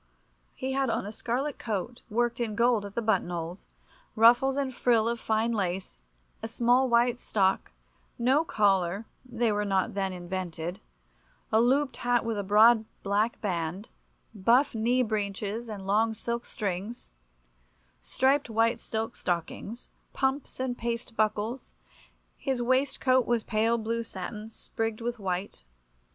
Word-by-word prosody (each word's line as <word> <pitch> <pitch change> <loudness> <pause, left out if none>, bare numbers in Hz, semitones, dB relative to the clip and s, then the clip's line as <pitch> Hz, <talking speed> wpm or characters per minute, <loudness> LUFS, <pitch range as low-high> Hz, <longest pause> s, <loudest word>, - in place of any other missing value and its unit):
He 260 +1 -3
had 270 -1 +1
on 230 - -1
a 205 - -5
scarlet 255 +6 -2
coat 225 +2 -4
worked 235 +2 0
in 225 -3 -2
gold 235 -2 +3
at 200 - -9
the 235 - -1
buttonholes, 175 -4 -1 0.5
ruffles 245 +4 +5
and 270 -2 -1
frill 235 -3 +2
of 235 0 -1
fine 220 +1 +1
lace, 190 -4 -3 0.4
a 225 - -3
small 245 +3 +3
white 240 +1 +3
stock, 195 -2 +1 0.5
no 260 +5 +3
collar 195 - +1 0.2
(they 240 -3 0
were 210 0 0
not 195 -2 0
then 195 -1 -1
invented), 175 -1 -5 0.7
a 220 - +5
looped 265 +3 +2
hat 245 -1 +1
with 230 -1 -1
a - - -1
broad 215 +3 +6 0.2
black 210 +3 +1
band, 180 0 -3 0.4
buff 235 +7 +3
knee 240 +3 +2
breeches 215 +1 -3
and 200 -3 -6
long 220 +3 +2
silk 235 +2 -4
strings, 205 +3 -4 0.9
striped 265 - +1
white 225 +1 +2
silk 225 +1 -4
stockings, 185 +6 -4 0.2
pumps 265 0 -1
and 255 -1 -2
paste 235 0 -3
buckles; 215 +3 -1 0.6
his 265 -3 -1
waistcoat 260 0 +2
was 235 -2 +1
pale 225 +1 +1
blue 230 +1 -2
satin, 210 +1 -7
sprigged 225 0 -4
with 240 0 -3
white. 185 - -3
225 Hz, 140 wpm, -28 LUFS, 200-240 Hz, 0.9 s, broad